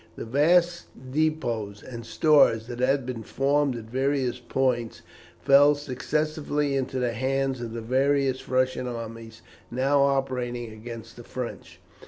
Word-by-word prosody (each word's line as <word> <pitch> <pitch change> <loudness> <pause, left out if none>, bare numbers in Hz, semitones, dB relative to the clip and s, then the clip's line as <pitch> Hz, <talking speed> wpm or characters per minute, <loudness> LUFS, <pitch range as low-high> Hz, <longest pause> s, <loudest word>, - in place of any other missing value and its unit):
The - - -6
vast 170 +7 +3 0.3
depôts 120 -9 -1
and 120 -2 -8
stores 130 -4 +4
that 120 0 -7
had 135 +1 +2
been 125 -3 -5
formed 140 +3 +1
at 115 - -6
various 130 +1 -1
points 120 -2 -1 0.4
fell 145 +2 +6
successively 145 +1 -2
into 130 -1 -2
the 125 -2 0
hands 135 +1 -1
of 115 -1 -5
the 115 - -4
various 135 +2 +1
Russian 130 0 +1
armies 115 -1 -7 0.3
now 135 +3 +2
operating 125 -4 -1
against 115 +1 -9
the 120 - -9
French. 125 0 -7
130 Hz, 135 wpm, -26 LUFS, 120-140 Hz, 0.4 s, fell